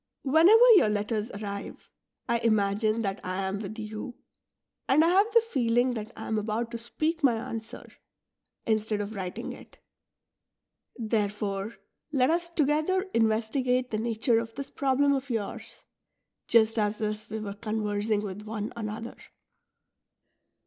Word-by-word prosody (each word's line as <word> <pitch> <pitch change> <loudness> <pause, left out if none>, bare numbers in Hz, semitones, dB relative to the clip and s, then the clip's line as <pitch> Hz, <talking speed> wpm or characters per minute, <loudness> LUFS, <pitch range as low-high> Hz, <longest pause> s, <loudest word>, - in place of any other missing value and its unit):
Whenever 345 - +7
your 215 - +4
letters 210 +1 -1
arrive, 200 -1 -7 0.4
I 235 -1 +1
imagine 215 0 +1
that 195 -1 -3
I 185 +1 -2
am 195 +1 -2
with 215 +1 -6
you, 215 +3 -6 0.7
and 305 +4 +5
I - - +4
have 400 +5 +4
the 465 - +6
feeling 245 - +1
that 220 -1 -5
I 220 - -6
am 220 - 0
about 225 +2 -2
to 235 - -5
speak 315 +8 -2
my 250 -4 +5
answer, 225 -1 -6 0.8
instead 215 -1 0
of 205 +1 -4
writing 185 -3 -5
it. - - -15 1.2
Therefore 210 -2 -2 0.4
let 265 -1 +3
us 340 +1 0
together 310 +4 +1
investigate 235 +3 +1
the 215 - -1
nature 225 +1 +1
of 230 0 -6
this 275 0 -6
problem 280 +1 +2
of 270 0 -2
yours, 225 0 -4 0.6
just 225 -1 +4
as 210 0 0
if 215 0 -3
we 220 - -4
were 205 -2 -5
conversing 210 0 -1
with 200 0 -6
one 215 0 -5
another.'' 225 +1 -5
225 Hz, 140 wpm, -28 LUFS, 210-255 Hz, 1.2 s, Whenever